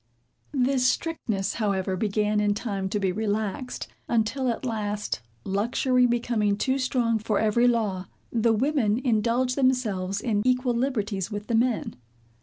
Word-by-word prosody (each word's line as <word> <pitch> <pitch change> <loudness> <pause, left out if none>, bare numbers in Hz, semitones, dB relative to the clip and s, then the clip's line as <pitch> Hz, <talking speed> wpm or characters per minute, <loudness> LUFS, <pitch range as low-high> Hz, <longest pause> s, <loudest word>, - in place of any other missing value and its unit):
This 260 -2 +2
strictness, 225 - -1
however, 195 -4 -1
began 210 +1 0
in 205 -1 +2
time 200 -4 -3
to 210 - -1
be 190 -2 +1
relaxed; 215 +4 -2 0.2
until 235 +4 +1
at 235 +2 -3
last, 210 - -2 0.2
luxury 245 +5 +2
becoming 230 -4 +1
too 265 +4 0
strong 240 -3 +1
for 215 -1 -1
every 225 +3 +3
law, 210 -6 0 0.2
the 230 0 +2
women 230 -2 +2
indulged 240 +2 +2
themselves 215 -8 +1
in 210 -2 0
equal 250 0 +2
liberties 225 -7 -1
with 205 -1 -5
the 235 - -3
men. 235 0 +1
225 Hz, 140 wpm, -26 LUFS, 205-250 Hz, 0.2 s, every